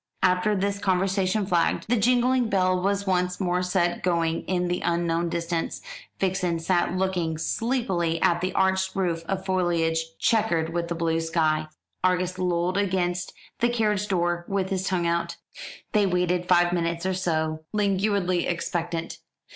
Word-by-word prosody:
After 185 +3 +3
this 200 +1 -1
conversation 195 +1 +1
flagged. 175 -3 +1
The 240 - +2
jingling 245 +2 +2
bell 185 -2 +2
was 200 +1 0
once 180 -1 0
more 180 -2 0
set 180 -1 0
going 165 -2 0
in 180 -1 0
the 175 0 -1
unknown 170 0 0
distance; 170 0 -2 0.4
Vixen 180 -3 0
sat 175 +1 0
looking 180 -4 -1
sleepily 180 -4 -1
at 175 +1 +2
the 185 +1 -1
arched 190 0 +1
roof 175 -4 -1
of 190 -1 -2
foliage 165 -3 0
chequered 170 -8 +1
with 170 0 -2
blue 165 -1 +1
sky. 160 -2 0 0.4
Argus 185 0 +1
lolled 180 0 0
against 180 -2 -1 0.3
the 240 - +3
carriage 210 -4 0
door 175 -2 0
with 195 -1 -1
his 190 0 -1
tongue 180 -2 0
out. 170 0 -1 0.6
They 210 -2 +3
waited 180 -1 0
five 175 -1 +4
minutes 170 0 -1
or 190 - +1
so, 160 -4 -1
languidly 200 -3 +1
expectant. 170 -1 -3
180 Hz, 145 wpm, -25 LUFS, 170-190 Hz, 0.6 s, five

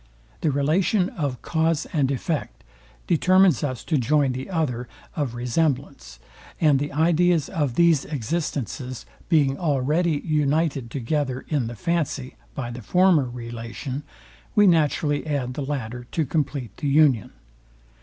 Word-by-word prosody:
The 155 - +1
relation 170 +7 +2
of 140 -7 -4
cause 160 -1 +1
and 140 -5 +2
effect 140 +3 -3 0.4
determines 185 - +4
us 130 -4 -3
to 155 -4 +1
join 140 +2 +2
the 130 +5 -5
other 130 -9 -1 0.3
of 135 -6 -2
resemblance; 125 - -1 0.4
and 150 -4 +4
the 145 +1 -3
ideas 165 +1 +2
of 145 -7 -1
these 170 -3 +4
existences 135 -2 -3 0.2
being 145 -5 +3
already 150 +1 +1
united 150 -4 +1
together 130 +1 -2
in 140 -7 0
the 120 - -6
fancy 145 -2 -2 0.2
by 120 -4 -4
the 120 +1 -7
former 175 - +3
relation, 120 +3 -6 0.5
we 210 - +6
naturally 155 -3 +2
add 135 -4 -1
the 145 - -4
latter 125 -4 -4
to 160 - +1
compleat 140 - -2
the 145 - -3
union. 140 -7 +4
145 Hz, 135 wpm, -24 LUFS, 125-160 Hz, 0.5 s, we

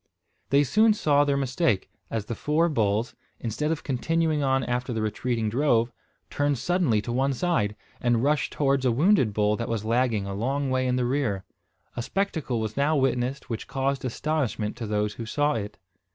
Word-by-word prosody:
They 140 +2 +5
soon 215 - +4
saw 145 -7 +3
their 140 -1 +1
mistake, 135 - 0 0.2
as 110 -2 -3
the 115 - -4
four 155 +7 +1
bulls, 110 -4 0 0.3
instead 120 +7 -2
of 160 -2 -2
continuing 155 +3 0
on 135 -1 +2
after 125 +1 -2
the 110 - -2
retreating 115 +1 -1
drove, 120 -1 +2 0.4
turned 145 -1 +1
suddenly 135 - +1
to 120 - -4
one 135 +3 +1
side, 125 - 0 0.3
and 120 -1 +2
rushed 150 +1 +1
towards 135 -2 +1
a 125 - +3
wounded 145 - +3
bull 105 0 +2
that 115 - -4
was 110 -2 -2
lagging 115 -3 +1
a 100 - -4
long 135 +6 -1
way 130 0 +1
in 125 - +1
the 125 -1 +1
rear. 120 -7 -1 0.5
A 120 - -2
spectacle 160 - -1
was 110 -1 -3
now 145 +3 +2
witnessed 130 0 0
which 115 - -5
caused 135 0 -1
astonishment 130 -4 -1
to 115 - -4
those 105 0 0
who 115 0 -7
saw 145 +4 +1
it. 105 -2 -4
130 Hz, 185 wpm, -26 LUFS, 115-145 Hz, 0.5 s, They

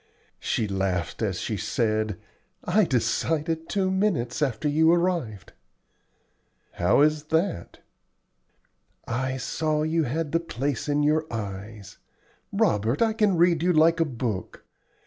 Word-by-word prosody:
She 110 - -1
laughed 95 -3 -2
as - - -1
she - - -3
said, 110 -3 -1 0.5
"I 200 +3 +3
decided 160 +5 -1
two 190 -2 0
minutes 190 - 0
after 135 -1 0
you 160 +3 +4
arrived." 170 - -1 1.2
"How 90 +10 +2
is 155 0 +2
that?" 160 - -2 1.3
"I 130 +2 -2
saw 155 +3 -1
you 160 0 +1
had 150 +4 -2
the 165 - +2
place 145 -4 -3
in 145 0 +2
your 155 +1 +1
eyes. 105 -2 -7 0.5
La, - - +3
Robert! 110 - 0
I 225 -1 +1
can 210 -4 +2
read 170 -1 +3
you 180 +1 +3
like 165 +1 +4
a 165 - +3
book. 115 - -5
150 Hz, 130 wpm, -25 LUFS, 115-165 Hz, 1.3 s, you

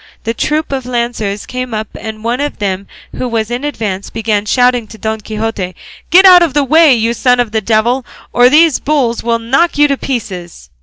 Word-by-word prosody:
The 230 - -2
troop 300 +7 -2
of 265 -2 -3
lancers 235 -4 -3
came 255 -2 -5
up, 215 0 -3
and 220 -1 -8
one 240 +4 -1
of 290 - -3
them 195 -2 -3 0.3
who 255 - -2
was 225 -1 -2
in 245 +3 -3
advance 210 -9 -4
began 215 -2 -2
shouting 245 -1 +2
to 220 - -12
Don 220 +1 -3
Quixote, 210 -4 -4 0.3
"Get 375 +3 +6
out 365 -2 +8
of 325 -5 +1
the 290 - +3
way, 310 0 +5
you 230 0 0
son 250 +1 +2
of 240 -3 0
the 220 0 -1
devil, 230 +5 +1 0.3
or 245 +1 +5
these 310 +1 +4
bulls 270 -6 0
will 230 0 0
knock 270 +10 0
you 295 0 +5
to 280 -1 -1
pieces!" 185 - -6
235 Hz, 205 wpm, -13 LUFS, 220-270 Hz, 0.3 s, out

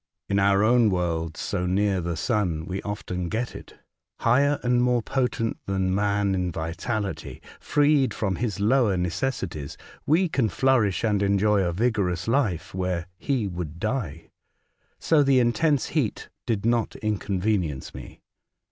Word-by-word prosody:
In 100 0 +1
our 100 +1 +4
own 120 0 +4
world, 85 -3 -1
so 90 -2 -2
near 95 0 +1
the 85 -1 -3
sun, 90 -8 -1
we 95 +1 -4
often 90 -4 -4
get 115 +5 -3
it. - - -11 0.5
Higher 140 +5 +3
and 125 0 +2
more 125 -2 +2
potent 125 -3 -1
than 95 -1 0
man 100 0 +1
in 90 -1 -1
vitality, 95 +6 -4 0.2
freed 145 -2 +2
from 95 -4 -2
his 105 -5 -2
lower 110 -2 +3
necessities, 90 - -3 0.3
we 170 +5 +3
can 130 -8 0
flourish 110 -4 +2
and 105 -3 +1
enjoy 100 +1 +3
a 90 -2 0
vigorous 95 -3 0
life 115 - 0
where 90 -2 -2
he 130 -6 -1
would 85 -3 -5
die. 105 - -3 0.7
So 160 -2 +3
the 135 -2 +4
intense 125 +4 +2
heat - - -2 0.2
did 110 -3 -1
not 115 -1 +1
inconvenience 100 -7 -2
me. - - -11
100 Hz, 145 wpm, -25 LUFS, 90-120 Hz, 0.7 s, our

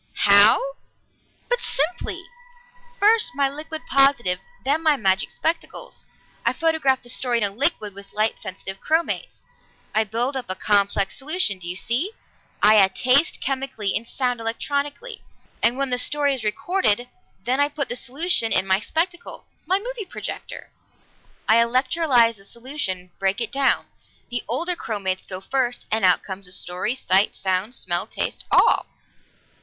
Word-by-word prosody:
How? 200 +1 +7 0.9
But - - +1
simply! 315 -6 -2 0.8
First 435 - +4
my 280 0 +2
liquid 310 +3 -7
positive, 275 - +3 0.3
then 290 +4 +2
my 310 -3 +3
magic 195 -5 +1
spectacles. 330 +1 -4 0.4
I - - +2
photograph 320 -5 +1
the 240 - -6
story 245 -1 +1
in 230 - 0
a 200 - +2
liquid 210 -3 0
with 200 0 -11
light 215 +1 0
sensitive 190 0 -8
chromates. 325 +2 -1 0.5
I 220 - +3
build 235 +6 -1
up 260 - -4
a 185 - -1
complex 200 0 +1
solution 280 - 0
do 175 - -6
you 180 - -3
see? 255 - 0 0.5
I 215 +1 +7
add 190 -2 +4
taste 275 +5 +3
chemically 265 -7 -2
and 230 +2 -2
sound 250 -2 -2
electrically. 285 - -3 0.4
And 235 +2 +3
when 275 -1 -1
the 250 - +3
story 285 +1 +2
is 260 -4 -4
recorded, 245 - +1 0.4
then 255 +3 +1
I 285 0 +3
put 285 -1 -3
the 245 - -3
solution 265 -2 0
in - - +3
my 190 0 +2
spectacle 345 - -3 0.2
my 375 +2 +3
movie 475 +1 -5
projector. - - -7 0.8
I 220 - +5
electrolyze 245 0 +3
the 195 - -18
solution, 200 -6 -5
break 195 +2 0
it 230 -2 -2
down; 275 -1 +1 0.5
the 245 -1 -2
older 340 +10 +2
chromates 195 - -3
go 185 -1 -6
first, 245 +3 -1
and 220 -1 +1
out 180 -2 +4
comes 190 -1 -7
the - - -5
story, 180 +6 -1
sight, 195 -5 +2
sound, 190 +5 -2
smell, 175 +3 -1
taste - - -3
all!" - - +4
245 Hz, 155 wpm, -22 LUFS, 200-285 Hz, 0.9 s, How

